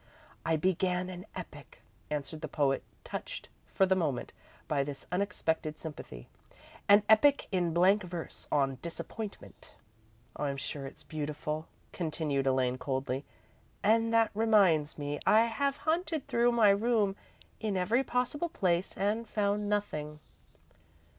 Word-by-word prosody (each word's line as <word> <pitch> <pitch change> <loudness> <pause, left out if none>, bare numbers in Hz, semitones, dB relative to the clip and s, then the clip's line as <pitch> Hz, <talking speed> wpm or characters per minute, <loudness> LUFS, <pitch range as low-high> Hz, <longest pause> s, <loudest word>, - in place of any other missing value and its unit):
"I 165 - +2
began 180 +2 0
an 180 +2 -9
epic," - - -10 0.3
answered 150 +1 -4
the 155 - -3
poet, 140 -2 +1 0.2
touched, - - -6 0.2
for 190 - +4
the 190 0 +3
moment, 155 -9 -1 0.3
by 140 -2 +1
this 140 0 -7
unexpected 170 -5 -1
sympathy. 145 - -8 0.6
"An 205 +1 +8
epic 270 +6 +5
in 180 -3 +1
blank 185 +5 +4
verse, 175 -3 -7
on 135 -2 +1
'Disappointment.'" 200 +5 -7 0.6
"I'm 140 -1 -2
sure 135 +1 -4
it's - - -12
beautiful," 150 0 -4 0.3
continued 150 -5 -1
Elaine, 130 -1 +1
coldly. 135 0 -2 0.6
"And 225 +2 +3
that 225 -1 +4
reminds 200 -9 +3
me. 145 0 -3
I 220 - +7
have 275 +5 0
hunted 315 -1 -1
through 240 +1 +3
my 220 -4 +6
room, 210 -1 +2 0.4
in 210 -3 -1
every 220 +8 +2
possible 260 +7 -1
place, 180 - 0
and 210 +4 0
found 205 0 0
nothing." 150 -8 -2
180 Hz, 130 wpm, -31 LUFS, 150-215 Hz, 0.6 s, An